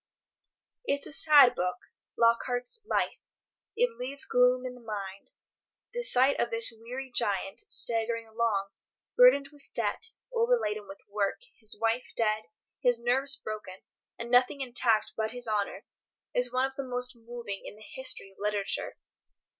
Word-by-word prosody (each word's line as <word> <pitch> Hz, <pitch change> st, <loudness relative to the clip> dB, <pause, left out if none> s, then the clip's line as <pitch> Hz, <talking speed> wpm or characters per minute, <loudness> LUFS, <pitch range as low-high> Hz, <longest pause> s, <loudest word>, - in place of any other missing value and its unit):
It's 280 Hz, -8 st, 0 dB
a -, -, -6 dB
sad 290 Hz, -4 st, +7 dB
book, 180 Hz, -2 st, -1 dB, 0.4 s
Lockhart's 245 Hz, -, +1 dB
"Life." -, -, 0 dB, 0.5 s
It 475 Hz, 0 st, +1 dB
leaves 270 Hz, +3 st, -2 dB
gloom 250 Hz, +1 st, +3 dB
in 250 Hz, -, -4 dB
the 250 Hz, -, -14 dB
mind. 200 Hz, -3 st, -6 dB, 0.6 s
The 485 Hz, -, -2 dB
sight 265 Hz, -, +4 dB
of 235 Hz, -, +1 dB
this 230 Hz, +1 st, +2 dB
weary 250 Hz, +4 st, -7 dB
giant, 200 Hz, -, +1 dB
staggering 230 Hz, 0 st, 0 dB
along, 220 Hz, -3 st, -1 dB, 0.4 s
burdened -, -, +6 dB
with 290 Hz, -2 st, -19 dB
debt, 455 Hz, -, -1 dB, 0.2 s
overladen 460 Hz, -, +1 dB
with 195 Hz, 0 st, -11 dB
work, 200 Hz, -, -1 dB, 0.2 s
his 215 Hz, -2 st, -4 dB
wife 230 Hz, +2 st, 0 dB
dead, 215 Hz, -1 st, +1 dB, 0.4 s
his 245 Hz, -2 st, +3 dB
nerves 265 Hz, +4 st, +2 dB
broken, 215 Hz, -7 st, -7 dB, 0.3 s
and 235 Hz, 0 st, -6 dB
nothing 250 Hz, +3 st, +4 dB
intact 240 Hz, -4 st, +1 dB
but 220 Hz, +1 st, -2 dB
his 245 Hz, -1 st, -1 dB
honour, 205 Hz, -1 st, -2 dB, 0.5 s
is 245 Hz, 0 st, +1 dB
one 255 Hz, +1 st, +2 dB
of 265 Hz, 0 st, -6 dB
the 275 Hz, -, -3 dB
most 250 Hz, -1 st, -2 dB
moving 235 Hz, -3 st, -7 dB
in -, -, -9 dB
the 215 Hz, 0 st, -12 dB
history 260 Hz, -6 st, -4 dB
of 195 Hz, -, -25 dB
literature. 205 Hz, -1 st, -2 dB
240 Hz, 150 wpm, -29 LUFS, 215-260 Hz, 0.6 s, sad